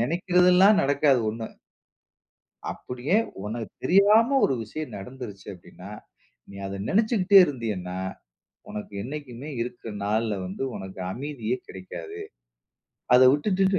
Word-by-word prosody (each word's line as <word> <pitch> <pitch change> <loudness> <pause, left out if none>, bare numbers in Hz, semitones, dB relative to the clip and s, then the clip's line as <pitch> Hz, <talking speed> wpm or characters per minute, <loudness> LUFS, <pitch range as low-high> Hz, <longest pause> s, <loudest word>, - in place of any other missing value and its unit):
நினைக்கிறதெல்லாம் 180 - +4
நடக்காது 140 -1 +3
1 110 +1 -4 1.3
அப்பிடியே 125 +9 -2 0.3
உனக்கு 110 +2 -5
தெரியாம 215 +7 +5
ஒரு 135 - +2
விஷயம் 125 +2 -7
நடந்துருச்சு 110 -2 -9
அப்பிடின்னா, 90 +2 -13 0.6
நீ 100 - -12
அத 100 0 -5
நினச்சிக்கிட்டே 205 -2 +4
இருந்தீயன்னா, 105 - -4 0.7
உனக்கு 105 0 -7
என்னைக்குமே 140 +1 -7
இருக்கிற 120 -1 -7
நாள்ல 110 +1 0
வந்து 95 +8 -6
உனக்கு 95 0 -8
அமைதியே 130 -2 -3
கிடைக்காது. 90 -3 -8 1.0
அத 125 - +7
விட்டுடிட்டு 190 +5 +2
125 Hz, 105 wpm, -25 LUFS, 105-180 Hz, 1.3 s, அத